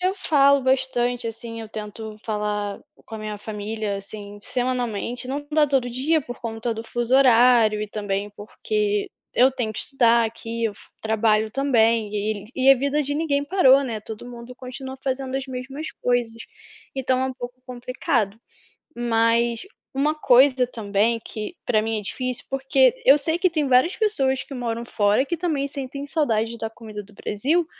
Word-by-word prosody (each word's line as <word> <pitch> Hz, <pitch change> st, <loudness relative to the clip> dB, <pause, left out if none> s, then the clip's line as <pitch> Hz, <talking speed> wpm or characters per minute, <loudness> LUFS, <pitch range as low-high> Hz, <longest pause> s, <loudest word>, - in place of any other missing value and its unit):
eu 370 Hz, +1 st, +1 dB
falo 280 Hz, -7 st, +4 dB
bastante 245 Hz, -2 st, +1 dB
assim, 230 Hz, 0 st, -6 dB
eu 220 Hz, -, -9 dB
tento 215 Hz, 0 st, -7 dB
falar 210 Hz, -2 st, -2 dB, 0.3 s
com 225 Hz, -, -9 dB
a 220 Hz, -, -5 dB
minha 215 Hz, -1 st, -5 dB
família, 210 Hz, 0 st, -4 dB
assim, 205 Hz, +1 st, -9 dB
semanalmente, 245 Hz, -1 st, -2 dB
não 285 Hz, +3 st, -4 dB
dá 300 Hz, -1 st, +4 dB
todo 270 Hz, -3 st, +1 dB
dia 275 Hz, +7 st, +1 dB
por 245 Hz, -3 st, -8 dB
conta 225 Hz, 0 st, -3 dB
do 225 Hz, +1 st, -6 dB
fuso 240 Hz, +2 st, -1 dB
horário 235 Hz, -4 st, +5 dB
e 215 Hz, -, -3 dB
também 205 Hz, -1 st, -3 dB
porque 210 Hz, 0 st, -2 dB, 0.2 s
eu 255 Hz, +2 st, +5 dB
tenho 240 Hz, -4 st, -3 dB
que -, -, -7 dB
estudar 235 Hz, -4 st, +3 dB
aqui, 230 Hz, +1 st, -5 dB
eu 215 Hz, -2 st, -1 dB
fu -, -, -18 dB
trabalho 220 Hz, 0 st, +2 dB
também. 230 Hz, -4 st, +2 dB
E 210 Hz, -1 st, -2 dB
e 260 Hz, 0 st, 0 dB
e -, -, +10 dB
a 270 Hz, -, +8 dB
vida 280 Hz, +3 st, 0 dB
de 285 Hz, +1 st, -3 dB
ninguém 290 Hz, -2 st, 0 dB
parou, 280 Hz, -6 st, +5 dB
né, 230 Hz, -5 st, -3 dB
todo 220 Hz, +3 st, -8 dB
mundo 240 Hz, +1 st, -10 dB
continua 260 Hz, +1 st, -8 dB
fazendo 265 Hz, 0 st, -2 dB
as 270 Hz, 0 st, -4 dB
mesmas 265 Hz, +4 st, -6 dB
coisas. 235 Hz, -2 st, -1 dB, 0.5 s
Então 260 Hz, -1 st, 0 dB
é 260 Hz, -, +1 dB
um 265 Hz, -, -3 dB
pouco 245 Hz, 0 st, -8 dB
complicado. 240 Hz, -4 st, -2 dB, 0.6 s
Mas, 230 Hz, 0 st, +2 dB, 0.3 s
uma 295 Hz, +3 st, +1 dB
coisa 260 Hz, -3 st, +5 dB
também 220 Hz, 0 st, 0 dB
que 215 Hz, +11 st, -6 dB
para 215 Hz, -, +2 dB
mim 220 Hz, 0 st, -1 dB
é -, -, -5 dB
difícil 255 Hz, +4 st, -4 dB
porque 270 Hz, -1 st, +3 dB
eu 275 Hz, +2 st, +8 dB
sei 320 Hz, +4 st, 0 dB
que 370 Hz, +1 st, +3 dB
tem 310 Hz, -4 st, -1 dB
várias 260 Hz, +8 st, +4 dB
pessoas 270 Hz, -, +1 dB
que -, -, -13 dB
moram 235 Hz, -1 st, -3 dB
fora 210 Hz, +2 st, +2 dB
que 340 Hz, +4 st, -2 dB
também 305 Hz, -5 st, -1 dB
sentem 275 Hz, 0 st, -6 dB
saudades 235 Hz, -7 st, 0 dB
da 225 Hz, -, -3 dB
comida 220 Hz, -2 st, -9 dB
do 205 Hz, +1 st, -19 dB
Brasil, 295 Hz, -, 0 dB
245 Hz, 175 wpm, -23 LUFS, 220-270 Hz, 0.6 s, e